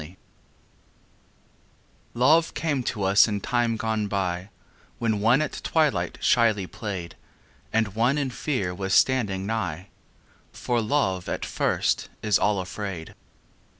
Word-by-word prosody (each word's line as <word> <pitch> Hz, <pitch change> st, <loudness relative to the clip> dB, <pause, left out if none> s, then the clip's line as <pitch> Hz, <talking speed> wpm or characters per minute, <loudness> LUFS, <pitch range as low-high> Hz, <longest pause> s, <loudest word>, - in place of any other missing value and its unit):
XXX 80 Hz, +5 st, -11 dB, 2.0 s
Love 155 Hz, +7 st, +4 dB
came 145 Hz, -5 st, -1 dB
to 115 Hz, -4 st, -3 dB
us 100 Hz, +4 st, +5 dB
in 105 Hz, -2 st, -2 dB
time 120 Hz, +1 st, 0 dB
gone 110 Hz, -2 st, -1 dB
by 95 Hz, -1 st, -2 dB, 0.5 s
When 110 Hz, -3 st, 0 dB
one 120 Hz, +8 st, +4 dB
at -, -, -5 dB
twilight 125 Hz, -, +1 dB
shyly 110 Hz, -5 st, +3 dB
played 90 Hz, -4 st, -6 dB, 0.6 s
And 110 Hz, -1 st, +1 dB
one 120 Hz, +6 st, +2 dB
in 140 Hz, -3 st, -1 dB
fear 120 Hz, -10 st, -2 dB
was 95 Hz, +1 st, -1 dB
standing 105 Hz, -8 st, +2 dB
nighâ 95 Hz, -6 st, -3 dB, 0.7 s
For 120 Hz, -1 st, -1 dB
Love 105 Hz, -7 st, 0 dB
at -, -, -3 dB
first -, -, 0 dB
is 105 Hz, -2 st, +3 dB
all 105 Hz, -2 st, +2 dB
afraid. 95 Hz, -3 st, -6 dB
105 Hz, 125 wpm, -25 LUFS, 95-120 Hz, 2.0 s, us